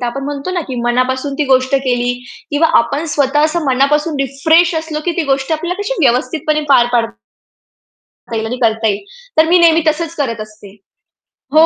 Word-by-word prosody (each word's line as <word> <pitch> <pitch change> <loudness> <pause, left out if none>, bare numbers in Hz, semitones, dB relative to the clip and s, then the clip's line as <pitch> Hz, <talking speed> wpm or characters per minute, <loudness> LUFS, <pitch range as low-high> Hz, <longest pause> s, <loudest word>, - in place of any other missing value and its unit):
तर 245 - -2
आपण 270 +3 -4
म्हणतो 285 +4 -4
ना, 365 -1 -1
की 260 - -4
मनापासून 260 +3 0
ती 300 - +2
गोष्ट 260 0 +2
केली 245 -2 0 0.4
किंवा 310 +2 +2
आपण 285 +6 -1
स्वतः 290 +1 +2
असं 315 +1 -1
मनापासून 280 +3 +1
रिफ्रेश 320 +6 +2
असलो 320 -1 -3
की 350 - 0
ती 345 - +1
गोष्ट 270 +3 -1
आपल्याला 345 +5 -3
कशी 415 +5 -2
व्यवस्थितपणे 275 +5 0
पार 245 -4 +5
पाडता 225 - -2 1.1
येईल. 220 0 -2
आणि 245 +3 -4
करता 225 0 +1
येईल. 200 -1 -1 0.3
तर 315 - +6
मी 355 - +5
नेहमी 330 -1 +5
तसंच 330 +1 -1
करत 230 -7 -2
असते. 210 -2 -12 0.8
हो. 315 +1 +7
275 Hz, 180 wpm, -15 LUFS, 245-315 Hz, 1.1 s, हो